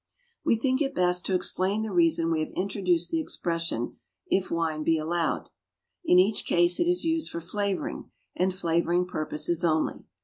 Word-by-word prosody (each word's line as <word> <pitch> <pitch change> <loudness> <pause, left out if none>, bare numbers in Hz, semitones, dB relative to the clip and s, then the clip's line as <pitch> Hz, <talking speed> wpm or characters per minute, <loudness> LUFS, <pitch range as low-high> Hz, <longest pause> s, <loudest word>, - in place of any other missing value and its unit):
We - - +3
think 260 +4 0
it 275 -1 -1
best 180 0 +1
to 190 - +1
explain 190 +3 0
the 220 - -4
reason 165 -1 +3
we 160 - +1
have 155 - -2
introduced 185 -3 0
the 330 - +1
expression, 165 - -2 0.3
"if 190 0 0
wine 165 -2 -1
be 160 +1 +2
allowed." 165 +1 -1 0.5
In 180 - +4
each 195 +4 +4
case 175 0 +2
it 345 - +2
is 355 0 +2
used 325 -1 0
for 170 - -5
flavouring, 200 +3 -3 0.3
and 185 +1 +1
flavouring 175 0 +1
purposes 155 0 -2
only. 160 -2 0
180 Hz, 170 wpm, -27 LUFS, 165-200 Hz, 0.5 s, In